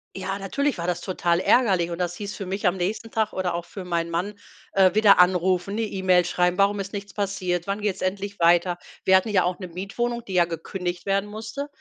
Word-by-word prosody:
Ja, 190 Hz, +1 st, -3 dB
natürlich 275 Hz, +8 st, -1 dB
war 170 Hz, -, -4 dB
das 175 Hz, 0 st, -1 dB
total 175 Hz, -2 st, 0 dB
ärgerlich 190 Hz, -6 st, +3 dB
und 170 Hz, -, -4 dB
das 175 Hz, -1 st, -2 dB
hieß 200 Hz, 0 st, -6 dB
für 195 Hz, -, -6 dB
mich 195 Hz, +2 st, -1 dB
am 180 Hz, +1 st, +1 dB
nächsten 205 Hz, +5 st, -3 dB
Tag 220 Hz, -1 st, -1 dB
oder 180 Hz, -2 st, -1 dB
auch 170 Hz, 0 st, -4 dB
für 195 Hz, -, -8 dB
meinen 170 Hz, -1 st, -2 dB
Mann, 180 Hz, +5 st, -2 dB, 0.4 s
äh, 190 Hz, -2 st, +5 dB
wieder 210 Hz, -2 st, +6 dB
anrufen, 180 Hz, +1 st, +3 dB
'ne 225 Hz, -, -1 dB
E-Mail 185 Hz, -2 st, +2 dB
schreiben: 180 Hz, +1 st, 0 dB
„Warum 200 Hz, +1 st, +3 dB
ist 195 Hz, +1 st, -5 dB
nichts 200 Hz, 0 st, -7 dB
passiert? 185 Hz, -4 st, -2 dB
Wann 200 Hz, +1 st, -3 dB
geht's 205 Hz, -3 st, -2 dB
endlich 200 Hz, +2 st, -3 dB
weiter?“ 175 Hz, +1 st, +3 dB, 0.3 s
Wir 190 Hz, -, +6 dB
hatten 190 Hz, +4 st, -1 dB
ja 190 Hz, -4 st, +3 dB
auch 180 Hz, 0 st, -1 dB
'ne 185 Hz, -, -7 dB
Mietwohnung, 235 Hz, +7 st, -3 dB
die 195 Hz, -, -8 dB
ja 175 Hz, -1 st, +4 dB
gekündigt 175 Hz, +2 st, -5 dB
werden 195 Hz, +1 st, +1 dB
musste, 220 Hz, +7 st, -6 dB
190 Hz, 225 wpm, -24 LUFS, 180-205 Hz, 0.4 s, wieder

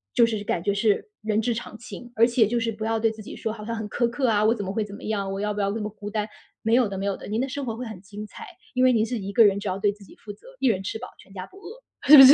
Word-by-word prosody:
就 235 Hz, -2 st, +7 dB
是 215 Hz, -3 st, -2 dB
感 175 Hz, -, -1 dB
觉 200 Hz, -, +2 dB
是 210 Hz, -, +2 dB
人 215 Hz, 0 st, +1 dB
之 235 Hz, +1 st, +1 dB
常 225 Hz, -1 st, -6 dB
情。 245 Hz, +1 st, -9 dB
而 230 Hz, +1 st, +6 dB
且 235 Hz, -3 st, +4 dB
就 240 Hz, +1 st, +1 dB
是 230 Hz, 0 st, 0 dB
不 215 Hz, 0 st, -6 dB
要 225 Hz, 0 st, +1 dB
对 225 Hz, 0 st, +3 dB
自 220 Hz, -1 st, -10 dB
己 -, -, -8 dB
说 220 Hz, -, -3 dB
好 210 Hz, -2 st, -8 dB
像 230 Hz, +1 st, -3 dB
很 220 Hz, -1 st, -4 dB
苛 240 Hz, -1 st, +1 dB
刻 255 Hz, +2 st, 0 dB
啊， 210 Hz, -2 st, +3 dB
我 225 Hz, +2 st, +4 dB
怎 205 Hz, -3 st, -4 dB
么 190 Hz, -, -3 dB
会 220 Hz, -, 0 dB
怎 205 Hz, -1 st, -8 dB
么 -, -, -11 dB
样， 200 Hz, -3 st, -1 dB
我 195 Hz, -, -3 dB
要 210 Hz, 0 st, 0 dB
不 205 Hz, -, -2 dB
要 200 Hz, -, +1 dB
那 220 Hz, +2 st, -2 dB
么 210 Hz, -, -2 dB
孤 205 Hz, 0 st, -8 dB
单。 210 Hz, 0 st, -1 dB, 0.4 s
没 225 Hz, +1 st, +2 dB
有 245 Hz, -3 st, +5 dB
的， 195 Hz, -, -4 dB
没 195 Hz, -, -2 dB
有 200 Hz, -, 0 dB
的， -, -, -10 dB
您 215 Hz, +2 st, -1 dB
的 265 Hz, -, +1 dB
生 280 Hz, +1 st, -4 dB
活 225 Hz, -3 st, -3 dB
会 250 Hz, -, -4 dB
很 220 Hz, -5 st, -8 dB
精 210 Hz, +1 st, -8 dB
彩， -, -, -10 dB, 0.3 s
因 255 Hz, 0 st, +2 dB
为 255 Hz, -, +7 dB
您 225 Hz, -2 st, +3 dB
是 235 Hz, -1 st, -2 dB
一 195 Hz, +1 st, -4 dB
个 225 Hz, +1 st, +7 dB
人， 200 Hz, 0 st, +4 dB
只 205 Hz, -, -5 dB
要 185 Hz, +1 st, -1 dB
对 205 Hz, 0 st, +2 dB
自 205 Hz, -1 st, -16 dB
己 -, -, -15 dB
负 205 Hz, -, -9 dB
责， 485 Hz, -, -18 dB
一 265 Hz, -, +3 dB
人 190 Hz, -5 st, +2 dB
吃 205 Hz, +3 st, -3 dB
饱 250 Hz, -, -7 dB
全 195 Hz, -, -17 dB
家 185 Hz, -1 st, -6 dB
不 385 Hz, -, -17 dB
饿， 425 Hz, +6 st, -11 dB, 0.3 s
是 300 Hz, +1 st, +12 dB
不 270 Hz, -, +13 dB
是？ 270 Hz, +2 st, +12 dB
220 Hz, 385 characters per minute, -25 LUFS, 205-235 Hz, 0.4 s, 不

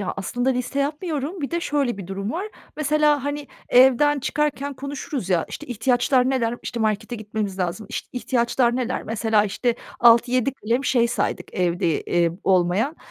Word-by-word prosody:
ya, 195 Hz, -, -2 dB
aslında 245 Hz, +6 st, -1 dB
liste 250 Hz, +2 st, -2 dB
yapmıyorum. 305 Hz, +2 st, -3 dB
Bir 275 Hz, -, -3 dB
de 340 Hz, 0 st, -1 dB
şöyle 280 Hz, -8 st, 0 dB
bir 185 Hz, -, -7 dB
durum 195 Hz, +2 st, -4 dB
var. 380 Hz, +5 st, -3 dB, 0.3 s
Mesela, 300 Hz, -2 st, +2 dB
hani, 290 Hz, 0 st, -3 dB, 0.2 s
evden 265 Hz, +3 st, +5 dB
çıkarken 285 Hz, 0 st, -1 dB
konuşuruz 275 Hz, -, -5 dB
ya, 170 Hz, -3 st, +2 dB
"İşte, 300 Hz, -, -8 dB
ihtiyaçlar 250 Hz, +2 st, +2 dB
neler? 240 Hz, -2 st, 0 dB
İşte, 235 Hz, -2 st, -4 dB
markete 220 Hz, +2 st, -1 dB
gitmemiz 210 Hz, -2 st, -4 dB
lazım. 185 Hz, +4 st, -2 dB
İşte, -, -, -5 dB
ihtiyaçlar 240 Hz, 0 st, +1 dB
neler?" 255 Hz, 0 st, -2 dB
Mesela 220 Hz, -1 st, +1 dB
işte 230 Hz, +4 st, 0 dB, 0.3 s
6-7 240 Hz, +2 st, +5 dB
kalem 240 Hz, +3 st, -1 dB
şey 240 Hz, -2 st, +3 dB
saydık 240 Hz, -, -2 dB
evde, 175 Hz, -3 st, +1 dB
eee, 170 Hz, -1 st, +1 dB
olmayan 190 Hz, -, +2 dB
245 Hz, 160 wpm, -23 LUFS, 215-280 Hz, 0.3 s, evden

